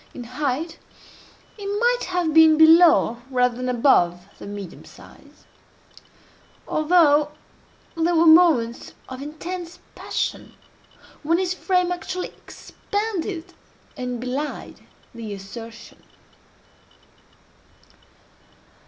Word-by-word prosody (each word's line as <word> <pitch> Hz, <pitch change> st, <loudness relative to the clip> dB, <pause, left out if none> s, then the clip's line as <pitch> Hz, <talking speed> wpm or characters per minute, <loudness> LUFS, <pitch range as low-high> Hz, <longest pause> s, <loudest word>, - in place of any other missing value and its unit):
In 245 Hz, -, -7 dB
height 280 Hz, +5 st, -4 dB, 0.8 s
he 415 Hz, -, -11 dB
might 475 Hz, +5 st, 0 dB
have 355 Hz, -3 st, -1 dB
been 320 Hz, -1 st, +6 dB
below 320 Hz, -7 st, +5 dB
rather 250 Hz, -2 st, +1 dB
than 255 Hz, 0 st, -3 dB
above 180 Hz, -9 st, +2 dB
the -, -, -9 dB
medium 200 Hz, -3 st, -8 dB
size: -, -, -18 dB, 1.2 s
although 305 Hz, -2 st, +3 dB, 0.7 s
there 335 Hz, +1 st, +1 dB
were 330 Hz, +1 st, +4 dB
moments 315 Hz, -8 st, +4 dB
of 260 Hz, 0 st, -8 dB
intense 335 Hz, +4 st, -7 dB, 0.2 s
passion -, -, -4 dB, 0.7 s
when 330 Hz, +3 st, +1 dB
his 365 Hz, 0 st, -1 dB
frame 365 Hz, -1 st, 0 dB
actually 360 Hz, +1 st, -4 dB
expanded 395 Hz, -4 st, -6 dB, 0.4 s
and 250 Hz, -1 st, -5 dB
belied 260 Hz, +5 st, -5 dB, 0.3 s
the 225 Hz, -3 st, -7 dB
assertion. 225 Hz, +4 st, -11 dB
310 Hz, 90 wpm, -22 LUFS, 250-355 Hz, 1.2 s, been